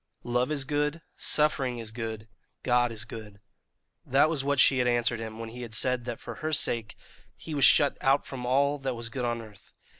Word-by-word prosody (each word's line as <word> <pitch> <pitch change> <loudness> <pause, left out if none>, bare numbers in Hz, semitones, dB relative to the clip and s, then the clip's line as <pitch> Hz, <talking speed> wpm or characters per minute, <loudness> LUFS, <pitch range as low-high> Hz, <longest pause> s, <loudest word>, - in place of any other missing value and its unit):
"Love 125 +1 0
is 150 -3 0
good; 150 +2 -1
suffering 140 -5 +1
is 115 -2 -6
good; 110 -1 -5 0.4
God 120 -1 +2
is 110 -1 -6
good" 105 -3 -10 0.6
that 140 +4 +3
was 145 -5 0
what 140 0 0
she 135 0 +5
had 125 - +2
answered 120 -1 +1
him 110 -1 -6
when 115 0 -6
he 125 +2 -9
had 115 -2 -4
said 125 +2 0
that 120 -2 -5
for 115 -3 -8
her 155 - -2
sake 115 -7 0 0.4
he 160 - -8
was 140 -2 +4
shut 145 -2 +5
out 135 +1 +3
from 130 -2 -7
all 140 +3 +2
that 135 -2 -3
was 115 0 -5
good 125 +1 -3
on 120 -1 -2
earth. 105 -3 -16
125 Hz, 210 wpm, -28 LUFS, 115-140 Hz, 0.6 s, she